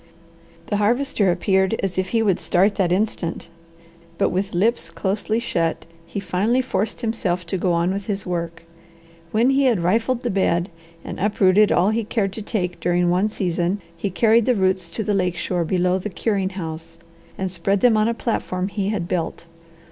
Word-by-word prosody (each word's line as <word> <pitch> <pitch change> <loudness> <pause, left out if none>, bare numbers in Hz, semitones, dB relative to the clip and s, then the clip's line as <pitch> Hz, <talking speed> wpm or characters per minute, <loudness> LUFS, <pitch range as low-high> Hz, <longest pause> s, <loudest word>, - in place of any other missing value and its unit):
The 205 - -1
Harvester 220 -1 +2
appeared 190 +3 +2
as 190 -2 -1
if 185 - 0
he 225 -1 +1
would 195 -5 +2
start 195 +4 +2
that 180 -3 +1
instant, 180 -4 -1 0.7
but - - +2
with 190 0 -2
lips 225 +7 +1
closely 210 +3 -1
shut 170 -9 -1 0.2
he 200 - -4
finally 200 +6 +1
forced 220 -3 -2
himself 190 -7 -1
to 180 +3 -2
go 180 0 +1
on 170 +2 +1
with 200 0 -5
his 200 -2 -3
work. 170 -2 -4 0.7
When 230 +7 +3
he 275 0 +3
had 230 -8 +3
rifled 225 +8 +1
the 245 - -1
bed, 180 -2 +1 0.3
and - - -6
uprooted 205 0 +4
all 185 +4 +3
he 225 +1 0
cared 205 -2 -1
to 220 - -6
take 185 -5 -3
during 175 0 +1
one 190 +4 +2
season, 180 -1 -1 0.2
he 200 - -3
carried 225 +4 +3
the 250 - +4
roots 185 -3 +1
to 220 +6 -4
the 210 - 0
lake 180 -3 0
shore 175 +1 -1
below 180 +2 +1
the 210 - -4
curing 195 0 -1
house, 165 -4 -7 0.4
and 190 -1 -2
spread 190 +3 0
them 240 -3 +5
on 215 0 +3
a 235 - 0
platform 190 -5 -2
he 200 -1 -2
had 195 -5 -2
built. 170 -2 -3
195 Hz, 185 wpm, -22 LUFS, 180-215 Hz, 0.7 s, them